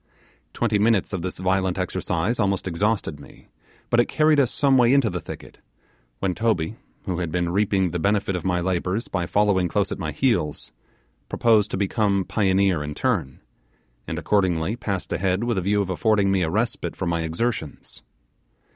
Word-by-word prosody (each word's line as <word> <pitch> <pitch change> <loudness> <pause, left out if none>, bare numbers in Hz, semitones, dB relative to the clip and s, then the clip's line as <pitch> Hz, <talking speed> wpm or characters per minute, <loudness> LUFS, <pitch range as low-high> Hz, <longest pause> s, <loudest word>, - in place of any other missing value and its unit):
Twenty 115 -3 +1
minutes 105 -2 +2
of 95 - -2
this 90 +1 -4
violent 95 0 0
exercise 95 +5 -1
almost 100 -3 0
exhausted 90 -3 -1
me, 70 - -16 0.4
but 120 - +4
it 120 - +4
carried 155 -1 +3
us 130 -4 +3
some 140 -2 +2
way 125 0 +5
into 135 -7 +3
the 90 - -3
thicket; - - -10 0.6
when 95 -2 -1
Toby, 110 -3 0 0.3
who 90 -2 -3
had 85 -3 -3
been 85 0 0
reaping 95 -2 +1
the 90 - -2
benefit 100 +1 +1
of 90 - -4
my 90 -1 0
labours 95 +4 -1
by 90 -3 -2
following 100 -3 +2
close 100 +3 -1
at - - -4
my 80 -4 -3
heels, 110 - -1 0.6
proposed 110 -3 +3
to - - -3
become 100 -1 +1
pioneer 95 -5 +2
in 75 0 -5
turn, 65 -1 -1 0.7
and - - -4
accordingly 95 -1 +1
passed 100 -6 -3
ahead 95 +3 0
with 120 -5 0
a - - -2
view 100 +2 +1
of 95 - -5
affording 100 +1 +2
me 95 -1 +2
a 80 - 0
respite 110 +7 -2
from 90 - -2
my 85 -1 0
exertions. 80 0 -3
95 Hz, 180 wpm, -23 LUFS, 90-110 Hz, 0.7 s, way